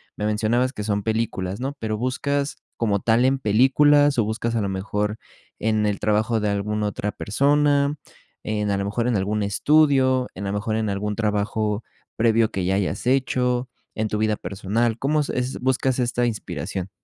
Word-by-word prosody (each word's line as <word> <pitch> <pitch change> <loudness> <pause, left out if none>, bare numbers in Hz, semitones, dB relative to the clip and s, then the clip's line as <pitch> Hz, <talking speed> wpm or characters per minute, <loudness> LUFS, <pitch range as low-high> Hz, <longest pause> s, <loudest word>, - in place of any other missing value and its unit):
Me 105 - -3
mencionabas 115 +4 +1
que 105 -6 -6
son 105 -2 -1
películas, 110 -4 -2
¿no?, 135 +2 -3
pero, 110 -1 -2
¿buscas, 140 +4 -1 0.2
como 105 -4 +1
tal, 115 +4 +3
en 135 0 +2
películas, 140 +5 +4
o - - +4
buscas, 115 +2 -2
a 110 - +1
lo 100 - -1
mejor, 105 +2 -2 0.4
en 110 -1 +1
el 100 - -1
trabajo 110 +2 +1
de 105 -1 0
alguna 105 +1 -1
otra 105 0 -3
persona, 145 +4 +2 0.5
en, 105 -1 -1
a 100 - +1
lo 100 - -2
mejor 115 +4 -1
en 120 - +1
algún 105 +2 0
estudio, 130 +3 +3
en 100 +2 -5
a - - -2
lo - - -2
mejor 110 +1 -2
en 110 -2 -1
algún 105 +1 -2
trabajo 105 0 -1 0.3
previo 115 -1 +3
que 95 -2 -2
ya 95 +1 +1
hayas 100 +4 -2
hecho 125 -1 +1 0.3
en 110 0 -1
tu 105 - -2
vida 110 -1 +1
personal? 110 +4 -1
¿Cómo 150 +2 +1
es 145 - -4
es 125 +1 -2
buscas 130 0 +1
esta 120 -1 +1
inspiración? 95 -3 -4
110 Hz, 185 wpm, -23 LUFS, 105-125 Hz, 0.5 s, películas